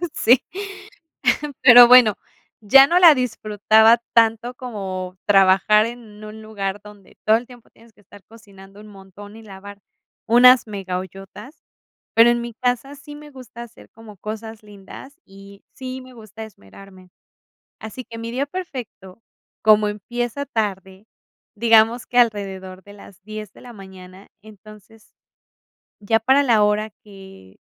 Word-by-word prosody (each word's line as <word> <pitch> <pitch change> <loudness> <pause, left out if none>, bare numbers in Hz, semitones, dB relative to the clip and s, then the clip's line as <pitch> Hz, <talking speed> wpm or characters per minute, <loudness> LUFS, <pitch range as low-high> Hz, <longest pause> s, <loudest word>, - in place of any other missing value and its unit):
sí, 250 +3 +2 1.2
pero 245 -2 +8
bueno, 245 -4 +6 0.5
ya 270 +6 +6
no 350 +1 +2
la 335 -4 +7
disfrutaba 220 -2 +2
tanto 230 +1 +1
como 190 -7 -7
trabajar 195 +2 +3
en 230 -3 -11
un 215 +1 -11
lugar 205 -2 -6
donde 210 -2 -17
todo 220 +1 +4
el 240 - -10
tiempo 245 -2 -18
tienes 230 0 -23
que - - -26
estar 205 0 -18
cocinando 200 -3 -17
un 215 - -15
montón, 205 +1 -15
y - - -14
lavar 200 0 -13 0.5
unas 245 +1 +5
mega 195 -3 -6
ollotas. 195 - -13 0.5
Pero, 230 +1 +5
en 240 - -2
mi 235 0 -8
casa 250 +2 -3
sí 290 +1 -13
me 295 0 -14
gusta 255 -3 -13
hacer 240 0 -17
como 220 -2 -16
cosas 220 +2 -9
lindas, 210 +7 -14
y 195 +1 -17
sí 260 0 -8
me 255 0 -16
gusta 220 -1 -12
esmerarme. 190 - -17 0.7
Así 220 +4 -9
que 230 -1 -12
mi 230 +1 -7
día 270 +3 -3
perfecto, 250 - -10 0.4
como 215 -1 +3
empieza 240 +6 -6
tarde, 195 -4 -5 0.5
digamos 225 +1 +2
que 245 - -5
alrededor 195 -5 -2
de 205 - -16
las 200 -2 -17
10 215 -1 -9
de - - -18
la 245 - -13
mañana, 190 -1 -15
entonces, 215 +1 -18 0.9
ya 225 +2 0
para 265 +5 +2
la 230 -6 +2
hora 210 +1 -1
que 190 - -16
215 Hz, 145 wpm, -20 LUFS, 200-240 Hz, 1.2 s, pero